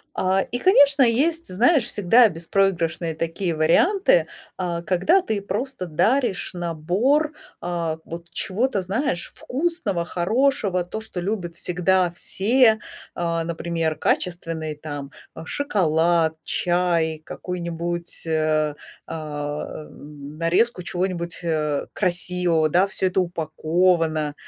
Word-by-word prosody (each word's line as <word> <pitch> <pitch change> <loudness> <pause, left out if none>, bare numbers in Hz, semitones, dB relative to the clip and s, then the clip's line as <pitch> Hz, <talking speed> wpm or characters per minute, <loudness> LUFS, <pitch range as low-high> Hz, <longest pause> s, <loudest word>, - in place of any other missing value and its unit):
А, 190 +1 +1
и, 245 - 0
конечно, 285 -6 +5
есть, 305 +8 +2
знаешь, 245 - +4
всегда 230 +3 +4
беспроигрышные 170 -2 -1
такие 165 +1 -2
варианты, 385 - +3 0.3
а, 175 -2 -2
когда 190 - +2
ты 215 - -2
просто 205 +1 -3
даришь 215 - +1
набор, 185 - 0 0.3
а, 170 -2 -2
вот 170 +1 -8
чего-то, 205 +3 0
знаешь, 190 - -2
вкусного, 255 - -2
хорошего, 200 0 +1
то, 215 +5 -6
что 220 -5 -6
любят 175 -4 -3
всегда 180 +1 +1
все. 220 +6 +3 0.4
А, 170 -1 -1
например, 165 -1 -2
качественный 165 -3 -1
там, 145 -2 -7 0.2
э, - - -8
шоколад, 170 - +1
чай, 170 -3 0
какую-нибудь, 170 -1 -4
э, 155 -1 +1 0.3
а, 150 -1 -5
м, 145 0 -11
нарезку 180 +6 +1
чего-нибудь, 175 -1 -2
э, 150 -3 -1
красивого, 180 -3 +1
да. 180 +5 +3
Всё 190 -1 +1
это 185 +1 +1
упаковано. 160 -2 0
175 Hz, 110 wpm, -23 LUFS, 165-210 Hz, 0.4 s, конечно